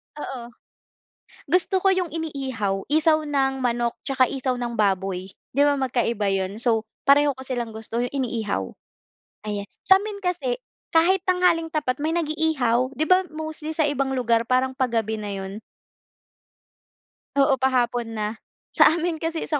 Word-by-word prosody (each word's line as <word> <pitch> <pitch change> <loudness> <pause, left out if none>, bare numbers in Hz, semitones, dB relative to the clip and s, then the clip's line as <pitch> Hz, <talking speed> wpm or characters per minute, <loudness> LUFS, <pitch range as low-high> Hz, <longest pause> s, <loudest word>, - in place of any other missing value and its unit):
Oo. 270 -4 -6 1.1
Gusto 365 +2 +2
ko 390 - +4
yung 365 -2 0
iniihaw, 260 -12 -3
isaw 310 +1 +3
ng 270 -2 0
manok 240 -1 0
tsaka 265 -1 +3
isaw 260 -2 -1
ng 240 -1 -3
baboy 190 -2 0 0.3
di 285 - +4
ba 290 -1 +4
magkaiba 235 -5 0
yun. 190 +1 -1
So, 225 -2 +1 0.2
pareho 285 -1 +5
ko 265 - -9
silang 240 -3 -3
gusto 225 +2 -3
yung 245 - -1
iniihaw, 225 - -1 0.8
ayan. 205 -1 -3 0.2
Sa'min 400 +2 +4
kasi - - -1 0.4
kahit 355 +3 +4
tanghaling 355 -3 +3
tapat 290 -5 -1
may 320 +2 0
nag-iihaw 295 -6 +1
di 310 - +1
ba 370 0 +4
mostly 315 0 -5
sa 315 - +3
ibang 275 -1 -1
lugar 235 -2 +2
parang 260 +1 +2
pa-gabi 225 -4 0
na 205 -1 -5
yun? 195 +2 -6 1.8
Oo, 275 -2 +3
pa-hapon 245 -2 +1
na 210 -1 -1 0.4
sa - - +6
amin 340 -1 -1
kasi 325 0 -2
sa 300 -3 +1
265 Hz, 145 wpm, -24 LUFS, 230-315 Hz, 1.8 s, sa